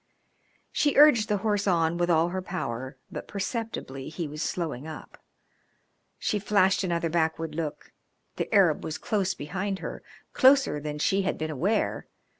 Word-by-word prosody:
She 290 -2 +1
urged 265 -7 +7
the 210 - +2
horse 205 -1 +1
on 170 -2 +2
with 175 0 +1
all 165 0 +3
her 185 +1 -3
power, 130 -7 -5
but - - -6
perceptibly 200 - -4
he 160 0 -4
was 150 +1 -6
slowing 160 -5 -3
up. 155 - -10 0.9
She 210 - -1
flashed 195 -1 +3
another 170 -2 0
backward 160 -1 0
look. 155 -2 -5 0.5
The - - -3
Arab 190 -8 +4
was 155 - -4
close 190 -3 -1
behind 190 +6 -3
her - - -6 0.3
closer 270 - +5
than 150 0 -5
she 195 +6 +2
had 190 - -1
been 155 0 -3
aware. 190 - 0
175 Hz, 155 wpm, -27 LUFS, 155-205 Hz, 0.9 s, urged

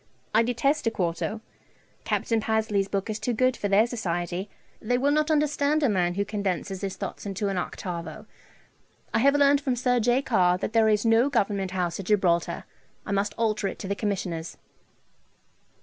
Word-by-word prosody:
I 220 - +5
detest 245 +4 0
a - - +5
quarto. 190 +2 -2 0.6
Capt. - - -1
Pasley's 215 -3 0
book 195 -1 -2
is 215 -1 -3
too 240 +2 -1
good 255 +2 +2
for 205 - -2
their 200 +3 +4
society. 180 -5 -3 0.3
They 245 +3 +1
will 275 +3 +2
not 305 +1 +2
understand 295 0 +2
a 275 - +4
man 180 -3 +1
who 200 +1 0
condenses 195 -2 -3
his 195 -2 -3
thoughts - - -6
into 200 +1 -2
an 195 - -2
octavo. 175 -1 -6 0.9
I 225 - +3
have 280 +4 +4
learned 285 0 +4
from 265 -3 0
Sir 245 0 +1
J. 245 +4 +2
Carr 180 -8 +3
that 205 - -4
there 225 -1 +4
is 210 +1 +2
no 230 +4 +4
Government 200 -6 0
House 180 -1 -2
at 190 - -6
Gibraltar. 180 -5 +1 0.4
I - - -5
must 200 +1 0
alter 220 -3 0
it - - -5
to 195 - -6
the 200 - 0
Commissioner's.' 185 -6 -3
210 Hz, 180 wpm, -26 LUFS, 190-245 Hz, 0.9 s, I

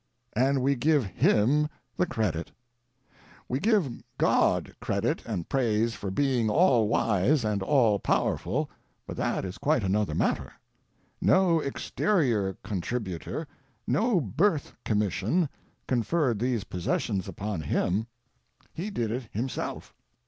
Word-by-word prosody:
And 130 +2 +2
we 140 +1 +3
give 145 0 +2
him 125 +10 +2 0.3
the 180 - +1
credit! 100 - -2 1.0
We 130 - -1
give 195 - +1 0.2
God - - +2
credit - - -1
and 95 -7 -3
praise 115 -3 +1
for 100 - -5
being 125 +1 +1
all 125 - +4
wise 115 +5 +2
and 105 -2 0
all 115 -3 +3
power - - +1
ful; 135 - -2 0.4
but - - -6
that - - -1
is 90 - -7
quite 140 -4 +2
another 100 +2 0
matter. - - 0 0.7
No 180 -3 +4
exterior 135 - 0
contributor, 105 - -4 0.4
no 225 -4 +2
birth 150 - 0
commission, 105 - +1 0.4
conferred 125 -1 +1
these 120 -3 0
possessions 95 +1 -2
upon 100 -4 -4
Him; 95 +8 0 0.7
He 185 +6 -4
did 120 - -2
it 120 0 -3
Himself. 120 +5 -4
120 Hz, 120 wpm, -28 LUFS, 105-150 Hz, 1.0 s, all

